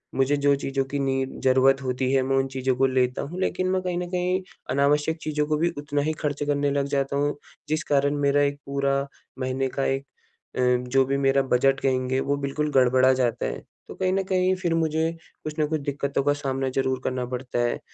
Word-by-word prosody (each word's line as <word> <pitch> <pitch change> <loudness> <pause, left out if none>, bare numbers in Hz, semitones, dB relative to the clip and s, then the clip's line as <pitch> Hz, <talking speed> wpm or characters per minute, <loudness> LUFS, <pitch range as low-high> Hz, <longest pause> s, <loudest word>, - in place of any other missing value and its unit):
मुझे 135 +2 +2
जो 140 0 +3
चीज़ों 135 0 -1
की 140 +1 -3
नीड 135 -1 -1
ज़रूरत 130 +1 +4
होती 130 0 -1
है, 135 - +4
मैं 135 +1 0
उन 135 - +2
चीज़ों 130 -1 -1
को 135 +2 +3
लेता 130 -1 +1
हूँ 175 +6 -6
लेकिन 185 0 0
मैं 185 0 +1
कहीं 180 -1 -2
न 175 0 -3
कहीं 180 +1 0 0.3
अनावश्यक 145 +4 +2
चीज़ों 150 -1 -1
को 155 0 +1
भी 170 +3 +2
उतना 145 0 -1
ही 155 +2 0
खर्च 145 -1 -1
करने 145 -1 +1
लग 140 0 0
जाता 140 0 -1
हूँ, 145 +1 0 0.3
जिस 155 0 0
कारण 145 0 +1
मेरा 140 0 +3
एक 140 0 +1
पूरा 140 0 0 0.3
महीने 130 +1 -1
का 135 - +1
एक 135 +1 -1 0.5
अ, - - -2 0.3
जो 135 +1 +4
भी 140 +1 0
मेरा 135 0 +3
बजट 135 +1 +2
कहेंगे, 130 0 0
वो 140 +1 0
बिल्कुल 140 +2 -2
गड़बड़ा 130 -1 +5
जाता 125 -2 0
है। - - -3 0.3
तो - - -9
कहीं 185 -1 0
न 195 - +1
कहीं 185 0 +1
फिर 180 -3 -1
मुझे 160 0 +1 0.3
कुछ 155 - -4
न 155 - +3
कुछ 155 -1 -2
दिक्कतों 140 0 -1
का 145 +1 +3
सामना 135 -2 -2
ज़रूर 130 -1 +1
करना 130 -1 -2
पड़ता 125 0 -4
है। 120 0 0
140 Hz, 220 wpm, -25 LUFS, 130-150 Hz, 0.5 s, गड़बड़ा